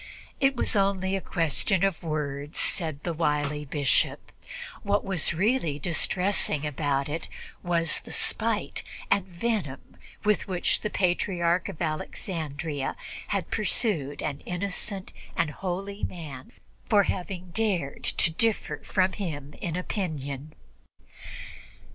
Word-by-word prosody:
It 270 0 +4
was 240 - +3
only 195 -1 +2
a 195 - -1
question 170 +3 +2
of 195 -3 +2
words, 150 -2 -2
said 155 -5 +3
the 170 - -1
wily 150 -2 0
Bishop; 140 -1 +1 0.5
what 200 0 +1
was 190 -4 +3
really 190 - +2
distressing 175 0 +1
about 140 -1 0
it 155 +3 -3 0.3
was 170 -1 +3
the - - -12
spite - - +2 0.3
and 195 -2 +3
the 175 -2 -16
venom 190 - -2 0.3
with 210 -1 +2
which 180 -2 +1
the 210 - -1
Patriarch 175 -2 +2
of - - -7
Alexandria 155 -2 -3 0.3
had 200 -3 -1
pursued 200 - +1
an 140 -1 -2
innocent 190 +1 -2 0.2
and 165 -3 +2
holy 195 +4 -4
man 145 -7 -5 0.4
for 205 -2 +6
having 185 -1 -3
dared 180 -9 0
to 165 - +3
differ 225 +6 +1
from 185 -1 +2
him 150 -8 -4
in 170 -3 -2
opinion. 155 -7 -3
175 Hz, 125 wpm, -28 LUFS, 150-195 Hz, 0.5 s, for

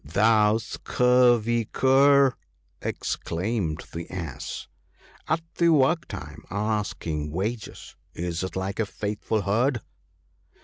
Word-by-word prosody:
" - - -38
Thou 105 +6 +3
scurvy 120 0 +2
cur! 135 +2 +4 0.2
" - - -42
exclaimed 85 -2 -2
the 85 0 -6
Ass 85 -8 -6 0.2
— - - -30
" - - -27
At 160 +1 +1 0.2
the 170 -1 +5
work 155 +1 +3
time, 75 0 -8
asking 95 -7 -2
wages 105 +8 -4
— - - -40
is 85 0 -3
it 95 - -5
like 95 +2 -3
a 110 - +1
faithful 105 +1 -2
herd 120 +5 +1
105 Hz, 130 wpm, -26 LUFS, 90-125 Hz, 0.2 s, the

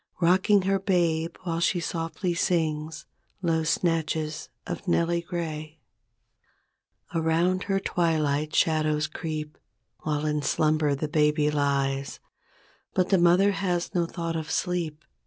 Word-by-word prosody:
Rocking 185 +3 +4
her 195 +1 +1
babe 170 -4 +1
while 165 -2 -2
she 175 +1 +2
softly 170 +2 -2
sings 160 -3 -1 0.4
Low 165 -2 +1
snatches 160 -2 -1 0.2
of - - -6
"Nellie 170 0 +2
Gray." 160 -3 -5 1.4
Around 170 +3 +1
her 195 -1 +1
twilight 155 -5 0
shadows 155 -1 +2
creep. 155 -1 -5 0.4
While 150 -1 -2
in 150 -1 0
slumber 155 -1 +2
the 150 +3 -3
baby 150 -1 +2
lies; 140 -1 0 0.8
But 185 -1 +2
the 195 - +4
mother 180 +4 +5
has 180 -3 -1
no 175 -3 +1
thought 165 -1 -4
of 160 -1 -4
sleep. 160 -3 -2
160 Hz, 120 wpm, -26 LUFS, 155-175 Hz, 1.4 s, mother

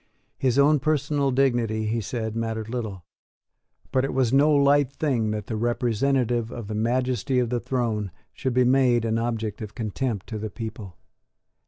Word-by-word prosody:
His 130 -1 +1
own 145 +1 +5
personal 145 -1 +1
dignity, 120 -5 +1
he 115 +2 -1
said, 110 +1 -4
mattered 110 -1 -3
little: 110 -8 -5 0.9
but 130 - +2
it 135 - -2
was 130 -2 +2
no 140 +3 +5
light 140 -1 +4
thing 130 -7 0
that 105 -1 -3
the 110 - -4
representative 120 +1 0
of 120 -4 -7
the 110 - -4
majesty 125 +3 0
of 125 -2 +1
the 120 - +1
throne 115 -6 -1 0.2
should 130 -2 -3
be 125 0 +4
made 125 -2 +3
an 115 0 0
object 115 -2 -3
of 105 -1 -7
contempt 115 -1 -3
to 110 -2 -4
the 110 +1 -4
people. 110 -4 -7
120 Hz, 170 wpm, -25 LUFS, 110-130 Hz, 0.9 s, own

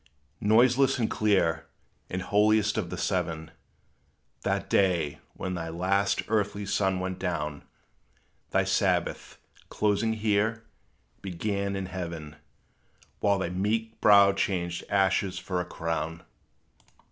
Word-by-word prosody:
Noiseless, 125 +6 +4
and 115 -3 0
clear, 90 -7 +1 0.4
and 95 0 -3
holiest 105 +2 +3
of 100 -6 -2
the 90 - -5
seven, 80 -4 -2 0.9
That - - -1
day 85 -7 +1 0.2
when 95 -1 -4
thy 80 -2 -4
last 95 +4 +1
earthly 105 -2 0
sun 95 -1 0
went 95 0 -4
down: 75 -5 -3 0.9
Thy - - +2
Sabbath, - - 0 0.3
closing 105 +2 +1
here, 110 +1 0 0.6
began 100 +2 -2
in 95 -1 -3
heaven; 85 -5 -6 0.8
Whilst 100 -2 +2
thy 85 - -1
meek 110 +5 -2
brow 100 -1 +7
changed 85 -3 -2
ashes 95 -1 +1
for 90 -1 -2
a - - -5
crown. 80 0 -4
95 Hz, 115 wpm, -28 LUFS, 85-105 Hz, 0.9 s, brow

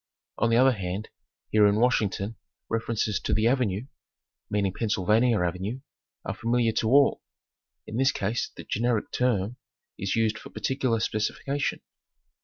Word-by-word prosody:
On 120 - +3
the 115 - +4
other 130 +2 +6
hand 100 -1 -4 0.4
here 105 -1 +6
in 100 - +3
Washington 110 -2 +1 0.3
references 110 -2 -1
to - - -1
"the 110 - +2
Avenue" 115 -4 +1 0.6
meaning 100 -2 0
Pennsylvania 110 +2 +2
Avenue 95 +8 -2 0.4
are - - -2
familiar 115 0 +1
to 110 - 0
all. 140 +2 +4 0.6
In 110 - -5
this 135 +2 +4
case 105 +1 -2
the - - -7
generic 115 -1 0
term 120 -2 0 0.4
is 95 0 -1
used 110 -1 +1
for - - -11
particular 125 +1 -1
specification. 135 +6 -1
110 Hz, 140 wpm, -27 LUFS, 105-125 Hz, 0.6 s, other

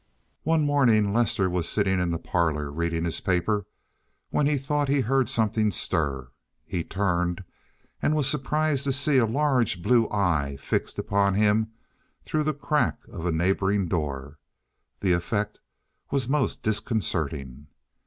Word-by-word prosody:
One 160 -1 +2
morning 115 -8 +3
Lester 115 -4 +2
was 90 -2 -1
sitting 95 -3 +1
in 90 -1 0
the 85 - -1
parlor 80 -4 -1
reading 85 +2 -2
his 85 - -2
paper 100 +3 0 0.6
when 145 - +2
he 150 -1 +2
thought 145 +2 -1
he 140 0 +2
heard 135 +2 +1
something 110 -1 +1
stir. 70 -9 -1 0.3
He 85 - -3
turned, 90 -2 -1 0.6
and 155 - +2
was 150 -3 +2
surprised 150 0 0
to 135 - +1
see 140 0 +3
a 115 - +3
large 125 - +1
blue 120 0 +3
eye 80 -9 0
fixed 70 - -2
upon 100 -1 +1
him 105 +1 +3 0.6
through 155 -1 -1
the 155 - +2
crack 150 +1 0
of 90 -3 -4
a - - +1
neighboring 95 +3 +1
door—the 75 +4 -5
effect 105 +4 -2 0.5
was 135 -4 0
most 140 0 0
disconcerting. 80 - -2
100 Hz, 145 wpm, -26 LUFS, 85-135 Hz, 0.6 s, morning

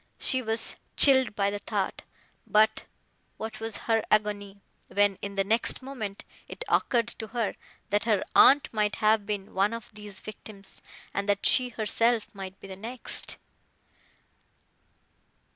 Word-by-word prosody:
She 260 - 0
was 225 -1 +1 0.2
chilled 260 -5 +5
by 200 0 +1
the 205 - -4
thought; - - -2 0.5
but, 215 +1 +3 0.5
what 220 0 -6
was 225 -1 -3
her 225 -1 +2
agony, 205 -1 0 0.3
when, 205 -1 +2
in 200 0 -5
the 195 - +2
next 225 +5 +2
moment, 220 -7 -6 0.2
it - - -6
occurred 235 -2 +2
to 220 - -5
her, 230 -1 -2 0.4
that 205 +1 +1
her 215 -4 +2
aunt 280 -2 +6
might 210 -1 +1
have 215 -1 +2
been 205 -2 -4
one 200 +3 +2
of 230 -1 -7
these 210 -2 -8
victims, 205 -2 -4 0.3
and 200 +1 -2
that 200 0 +1
she 250 -1 +5
herself 230 0 0
might 195 -1 -8
be - - -11
the 190 - -7
next! 230 +5 -1
215 Hz, 145 wpm, -28 LUFS, 200-230 Hz, 0.5 s, aunt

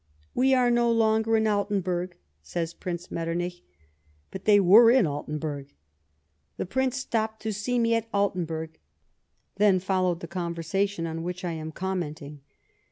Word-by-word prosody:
" 75 0 -35
We 265 +1 +3
are 250 -1 +3
no 240 0 +3
longer 220 0 +2
in 220 - +1
Altenburg," 190 -4 -1 0.2
says 165 - -4
Prince 175 0 -6
Metternich. 175 +2 -3 0.7
But 190 - -8
they 205 -1 +6
were 205 +5 +7
in 250 -3 +5
Altenburg. 145 - -5 0.4
" 75 -1 -46
The - - -2
Prince 260 +6 -1
stopped 220 -4 -2
to 220 -1 -2
see 225 +5 -1
me 230 -1 +2
at 230 0 -1
xVlten 200 -4 0
burg; 160 0 -6 0.4
" - - -48
then 200 -2 +4
followed 185 -2 0
the - - -6
conversation 170 +1 -2
on 165 0 -4
which 180 +2 -5
I 175 - -1
am 160 -1 -5
commenting. 155 -5 -5
185 Hz, 165 wpm, -26 LUFS, 165-220 Hz, 0.7 s, were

